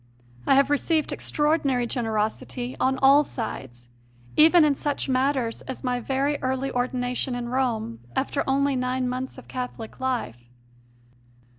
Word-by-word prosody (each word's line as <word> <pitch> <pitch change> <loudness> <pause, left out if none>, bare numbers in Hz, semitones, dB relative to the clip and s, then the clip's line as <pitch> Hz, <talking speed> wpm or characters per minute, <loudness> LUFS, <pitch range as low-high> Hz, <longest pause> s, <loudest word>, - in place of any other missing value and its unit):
I - - +6
have 275 +1 +4
received 310 +2 +1
extraordinary 295 -5 +1
generosity 230 +2 -2
on 265 0 +2
all 280 +2 +7
sides, 130 - -6 0.5
even 320 +1 +7
in 295 - +4
such 285 +1 -2
matters 260 -3 0
as 260 - -6
my 250 -1 0
very 275 +4 0
early 265 0 -1
ordination 250 0 -1
in 240 -1 -4
Rome 235 - -1 0.2
after 280 +1 0
only 275 +1 +2
nine 255 0 -1
months 255 +1 -4
of - - -12
Catholic 250 -3 -6
life. 125 - -3
260 Hz, 135 wpm, -25 LUFS, 245-275 Hz, 0.5 s, all